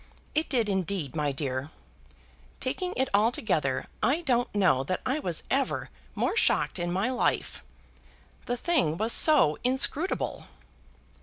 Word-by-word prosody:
It 310 +1 0
did, 235 -5 +1
indeed, 190 -7 -2
my 150 -2 0
dear. 135 0 -4 0.9
Taking 365 -1 -3
it 265 - +1
altogether, 200 - +1 0.2
I 290 +7 +1
don't 245 -6 0
know 180 -10 +3
that 185 - -2
I 265 +4 0
was 175 - -3
ever 270 0 -1 0.2
more - - 0
shocked 440 - +1
in 175 0 -2
my 195 +8 0
life. 255 - -1 0.8
The 245 - -1
thing 225 - +1
was 220 +4 +2
so 285 - +5
inscrutable!" 265 +7 +1
215 Hz, 135 wpm, -27 LUFS, 160-265 Hz, 0.9 s, so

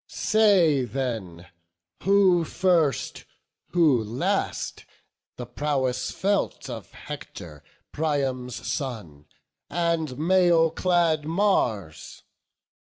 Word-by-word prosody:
Say 190 -10 +3
then 110 -9 -4 0.6
who 190 -3 +4
first, 170 -4 0 0.4
who 155 -10 +3
last, 115 +5 -2 0.5
the 125 - -6
prowess 130 -2 -1
felt 200 +1 -1
Of - - -7
Hector, 75 -4 -10 0.3
Priam's 135 -5 -2
son, 105 - -5 0.4
and 165 -5 -1
mail 170 0 +3
clad 165 -3 +1
Mars? 120 - -1
150 Hz, 80 wpm, -25 LUFS, 125-175 Hz, 0.6 s, who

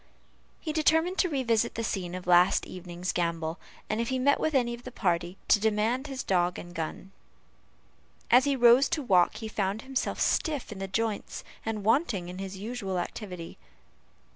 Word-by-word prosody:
He 310 - -4
determined 320 +4 +2
to 365 - +3
revisit 235 -5 +1
the 230 - -2
scene 185 -5 -3
of 185 - -6
the 180 - 0
last 175 +1 +5
evening's 180 0 -5
gambol, 170 -1 -2 0.3
and 215 +2 -1
if 235 - -2
he 260 - 0
met 280 +3 +3
with 315 -2 0
any 240 -2 +2
of 235 - -8
the 255 - -8
party, 175 -4 -1
to - - +6
demand 220 +6 +1
his 270 -2 -5
dog 180 -1 +1
and 175 0 -9
gun. 165 +3 -5 1.2
As 250 +3 +7
he 280 -1 +2
rose 245 +2 +6
to 300 - -1
walk, 185 -5 +4
he 220 0 -5
found 205 0 -2
himself 265 -1 -2
stiff 295 -8 0
in 205 - -7
the 195 - -3
joints, 215 +2 -2 0.2
and 220 -2 -3
wanting 220 - +1
in 180 +1 -7
his 195 0 -6
usual 200 -2 -4
activity. 180 -1 -6
215 Hz, 185 wpm, -28 LUFS, 180-255 Hz, 1.2 s, As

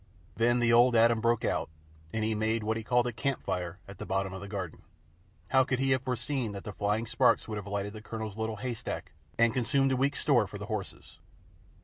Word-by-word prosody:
Then 120 +2 +3
the 120 -1 +3
Old 120 +1 +6
Adam 115 0 +5
broke 115 0 +2
out, - - 0 0.4
and 110 +3 -1
he 110 +1 +1
made 110 +1 0
what 110 +1 0
he 115 - -3
called 120 +1 +2
a 120 - -1
"campfire" 90 -8 -2
at 100 -1 -11
the - - -5
bottom 95 0 -1
of 95 - -6
the 100 - -7
garden. 95 -5 -5 0.7
How 130 0 +5
could 130 0 -1
he 135 +1 +1
have 130 -1 +3
foreseen 125 -2 -2
that 100 - -7
the 105 - -6
flying 105 +3 0
sparks 120 +1 +3
would 110 -2 -4
have 105 - -9
lighted 100 0 -3
the 110 - -8
Colonel's 110 -2 -5
little 110 0 -2
hayrick 120 0 -5 0.3
and 115 -1 +4
consumed 135 +2 +2
a - - +3
week's 135 +2 +1
store - - +3
for - - -8
the - - -6
horses? - - -6
115 Hz, 225 wpm, -30 LUFS, 105-125 Hz, 0.7 s, Old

